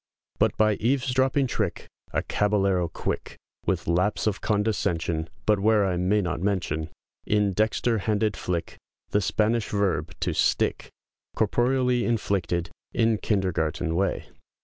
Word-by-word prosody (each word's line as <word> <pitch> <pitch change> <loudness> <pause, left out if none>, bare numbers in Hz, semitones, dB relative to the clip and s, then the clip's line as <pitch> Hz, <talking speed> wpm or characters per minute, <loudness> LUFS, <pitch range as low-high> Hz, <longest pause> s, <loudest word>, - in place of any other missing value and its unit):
But - - +2
by 110 -1 +3
eavesdropping 130 +2 +1
trick, 105 -7 -2 0.3
A - - 0
caballero 100 -4 +1
quick, - - -4 0.3
With - - 0
lapse 90 +5 +1
of 105 -2 0
condescension, 85 -7 0 0.2
But 105 -2 +3
where 105 0 +3
I 95 -2 0
may 95 +4 +2
not 90 -2 -2
mention, 85 -5 -1 0.4
In 105 -2 +2
dexter 110 +3 +1
handed 105 0 0
flick, 85 -2 -3 0.3
The 105 - +2
Spanish 110 +3 +1
verb 95 -5 0
to - - 0
"stick" - - +1 0.5
Corporeally 125 0 +2
inflicted, 95 -7 -1 0.2
in 115 -2 +2
kindergarten 85 -5 0
way. 100 +3 0
105 Hz, 125 wpm, -26 LUFS, 90-110 Hz, 0.5 s, by